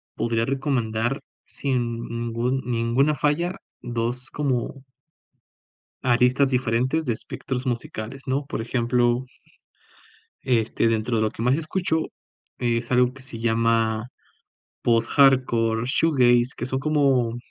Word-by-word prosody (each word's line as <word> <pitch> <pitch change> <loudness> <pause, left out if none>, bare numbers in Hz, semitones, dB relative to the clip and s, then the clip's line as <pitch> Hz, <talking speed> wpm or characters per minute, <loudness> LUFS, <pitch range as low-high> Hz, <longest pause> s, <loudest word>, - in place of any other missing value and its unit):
podría 115 -1 0
recomendar 130 -2 -1 0.3
sin 120 -4 -2
ningún 120 +3 -2
ninguna 125 +5 +1
falla 165 +6 0 0.3
2 120 +2 -3
como 135 -2 -2 1.2
aristas 125 +3 +3
diferentes 130 +5 +1
de 120 - +1
espectros 125 +3 -5
musicales, 120 +1 -4
¿no? 135 +2 0
Por 125 - -4
ejemplo 120 +1 +1 1.2
este, 115 -3 +1
dentro 115 +1 0
de - - +1
lo 110 - 0
que 115 - -8
más 125 +3 +3
escucho, 160 0 0 0.6
es 120 0 -1
algo 125 0 +3
que 140 - -11
se 130 -3 -5
llama 115 0 +1 0.7
post-hardcore 120 -1 +3
shoegaze, 125 -4 +3
que - - -3
son 130 +1 -2
como 135 -5 +2
125 Hz, 115 wpm, -24 LUFS, 115-135 Hz, 1.2 s, aristas